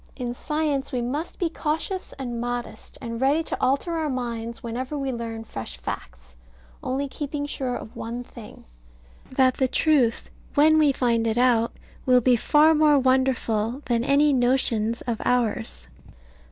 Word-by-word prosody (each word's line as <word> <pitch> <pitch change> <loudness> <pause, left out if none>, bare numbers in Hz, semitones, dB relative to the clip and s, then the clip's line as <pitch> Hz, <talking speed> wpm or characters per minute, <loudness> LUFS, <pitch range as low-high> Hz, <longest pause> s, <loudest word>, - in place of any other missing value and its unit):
In 245 -2 -4
science 295 0 -2
we 250 - -1
must 290 +8 -4
be 350 - 0
cautious 325 +4 -3
and 240 -3 -4
modest, 245 -2 -5
and 230 -1 -5
ready 285 +5 +3
to - - -4
alter 275 +6 +1
our 310 -2 -1
minds 235 -3 -4
whenever 255 +5 -4
we 275 -1 -2
learn 230 -2 -5
fresh 115 - -7
facts; - - -8 0.5
only 275 +2 -2
keeping 290 +1 -4
sure 260 -3 -3
of 220 - -8
one 235 +2 -5
thing, 235 -2 -13 0.7
that 260 -1 +3
the 260 - +2
truth, 260 -5 +2 0.3
when 310 +2 +6
we 300 -2 +5
find 235 -3 +1
it 220 +1 0
out, 240 -2 +3 0.3
will 250 -1 +6
be 250 +1 +4
far 300 +6 +4
more 300 -1 +5
wonderful 260 -2 +1
than 235 -2 +1
any 285 +2 +4
notions 245 -3 +1
of 235 -3 -3
ours. 205 - -1
255 Hz, 155 wpm, -24 LUFS, 230-285 Hz, 0.7 s, when